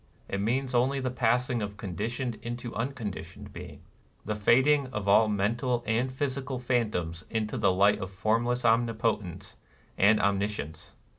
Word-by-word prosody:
It 100 - -2
means 130 +5 0
only 130 +3 +2
the 130 -1 -2
passing 125 0 +1
of 105 0 -5
conditioned 110 +4 -4
being 120 - -4
into 120 -1 -6
unconditioned 115 -4 -5
being, - - -10 0.2
— - - -35
the 105 - -1
fading 130 +7 +4
of 105 -5 -5
all 105 +2 +6
mental 115 +4 0
and 120 +4 0
physical 135 0 -3
phantoms 105 -9 -1
into 110 +2 -2
the 105 -6 +3
light 100 +3 +4
of 95 -2 -4
Formless 115 +5 0
Omnipotence 115 -5 0 0.4
and 105 +2 +5
Omni 100 0 +2
science. 80 -6 -8
115 Hz, 155 wpm, -28 LUFS, 100-125 Hz, 0.4 s, all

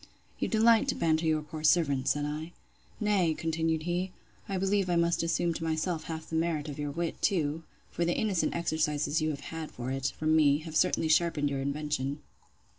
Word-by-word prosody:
You - - 0
delight 225 +2 +4
to 270 - 0
banter 160 0 +1
your 155 -1 +1
poor 155 +1 -8
servant, 145 -5 +3
said 145 0 +1
I. 155 +3 -5 0.5
Nay, 195 -7 +2
continued 160 -1 -1
he, 180 +2 -1 0.4
I 195 - -1
believe 195 0 +1
I 175 - +2
must 170 0 +2
assume 170 +1 0
to 165 - -5
myself 160 +1 -1
half 160 -1 -6
the 160 - -4
merit 160 -2 0
of 145 - -7
your 145 0 -2
wit, 165 +3 -3
too; 160 -5 +1 0.3
for 170 - -1
the 170 +1 0
innocent 200 -5 0
exercises 155 -2 0
you 155 - +1
have 145 -2 -4
had 160 -1 -5
for 125 +1 -5
it, 135 0 -1
from 155 0 +2
me, 145 -2 +5
have 160 -1 -7
certainly 180 -1 +2
sharpened 155 -3 +2
your 135 -1 -2
invention. 140 0 -2
160 Hz, 195 wpm, -30 LUFS, 150-170 Hz, 0.5 s, me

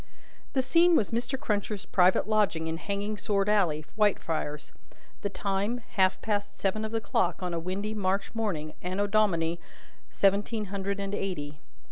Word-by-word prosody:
The 265 - +2
scene 340 +5 +5
was 210 - +2
Mr. 240 +3 -1
Cruncher's 205 -2 -2
private 185 +2 +3
lodging 210 -7 +2
in 160 0 -2
Hanging 200 +3 -3
sword 200 -2 +1
alley, 175 -8 +2
Whitefriars: 165 -8 0 0.5
the 200 - -1
time, 200 +5 -1
half 190 -3 +3
past 205 -2 -2
seven 200 +2 0
of 220 - -3
the 225 - 0
clock 185 -4 0
on 180 -1 -2
a 170 - -1
windy 195 +5 -3
March 195 -1 -1
morning, 175 -10 -2
Anno 185 +3 -1
Domini 175 -6 +2 0.5
seventeen 205 +2 +1
hundred 200 0 -2
and 200 0 -3
eighty. 155 -7 -3
200 Hz, 155 wpm, -28 LUFS, 180-215 Hz, 0.5 s, scene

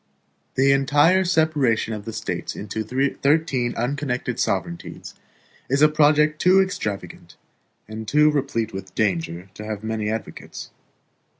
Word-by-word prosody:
The 135 +1 +4
entire 145 +7 +4
separation 155 -11 +1
of 105 -1 -6
the 115 - -5
States - - -4
into 105 +2 -4
thirteen 135 +1 0
unconnected 125 -1 -2
sovereignties 170 -1 -3 0.6
is 140 +3 +3
a 150 - +7
project 150 0 +3
too 185 +2 +5
extravagant 110 - -3 0.5
and 110 +1 -7
too 150 +5 +4
replete 135 -7 -2
with 95 -1 -8
danger 90 -2 -1
to 105 - -9
have 105 -1 -5
many 110 -1 -2
advocates. 110 -1 -6
130 Hz, 125 wpm, -23 LUFS, 110-150 Hz, 0.6 s, a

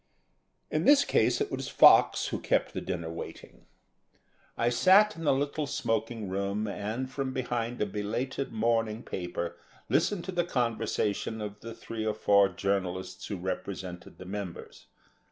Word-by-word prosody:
In - - 0
this 285 0 +6
case 110 - +2
it - - -1
was - - -3
Fox - - +6
who - - -3
kept - - 0
the - - -3
dinner 85 -3 -4
waiting. 85 - -9 0.9
I 120 - +2
sat 190 - +5
in 165 - -7
the - - +5
little 145 +2 -1
smoking 115 -3 -2
room 100 +3 -2
and, 110 +5 -3
from 135 0 -3
behind 120 -2 -2
a - - +1
belated 115 +7 -3
morning 115 0 0
paper, 85 -1 -4 0.3
listened 200 -5 +1
to 190 - -4
the 175 -1 +1
conversation 115 - -1
of 105 -1 -6
the 115 +1 -8
three 115 -1 -6
or 110 -1 -1
four 100 -2 +4
journalists 95 -1 -2
who 100 - -4
represented 90 0 -5
the 95 - -10
members. 95 -2 -7
110 Hz, 155 wpm, -29 LUFS, 100-125 Hz, 0.9 s, this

